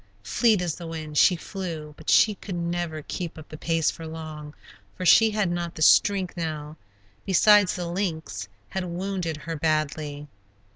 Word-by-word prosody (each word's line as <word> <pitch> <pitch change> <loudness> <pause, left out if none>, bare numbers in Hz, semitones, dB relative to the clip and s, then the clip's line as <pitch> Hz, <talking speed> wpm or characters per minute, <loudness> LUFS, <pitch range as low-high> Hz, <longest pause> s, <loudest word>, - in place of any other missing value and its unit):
Fleet 220 -6 +2
as 170 -3 -1
the 170 0 -8
wind 155 -2 -6
she 185 - +6
flew 165 -4 -6
but 155 - -7
she 215 - +5
could 195 -1 -7
never 170 -2 -3
keep 170 +1 -5
up 155 - -11
the - - -8
pace 165 0 0
for 165 -1 -9
long, 155 -2 -8 0.4
for 185 - -4
she 225 +5 +7
had 210 -4 0
not 175 -1 -3
the 155 - -1
strength 195 +1 +4
now; 155 -3 -4 0.5
besides, 200 +1 +5
the 180 - -3
lynx 165 - -3 0.2
had 190 -1 -3
wounded 180 -2 -3
her 165 -1 -3
badly. 150 -1 -1
170 Hz, 165 wpm, -25 LUFS, 155-185 Hz, 0.5 s, she